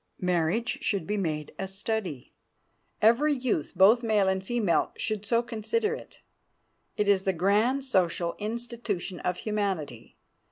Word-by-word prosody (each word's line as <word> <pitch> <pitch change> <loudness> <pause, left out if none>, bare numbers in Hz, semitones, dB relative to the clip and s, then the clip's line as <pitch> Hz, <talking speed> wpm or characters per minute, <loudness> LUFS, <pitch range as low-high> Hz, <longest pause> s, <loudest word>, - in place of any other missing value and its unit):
Marriage 180 +6 0
should 200 -6 -1
be 210 - -1
made 155 -6 -2
a 195 - -2
study. 195 - -4 0.7
Every 275 +7 +5
youth, 245 - -1
both 205 +6 +6
male 215 -4 +2
and 190 0 0
female, 210 -4 +1
should 215 -2 -3
so 235 +1 +2
consider 245 - -1
it. - - -10 0.8
It 210 - +1
is 200 -2 +4
the 190 0 0
grand 210 +10 +2
social 175 -8 0
institution 220 -4 -4
of 180 0 -2
humanity. 190 - -3
205 Hz, 135 wpm, -28 LUFS, 185-235 Hz, 0.8 s, both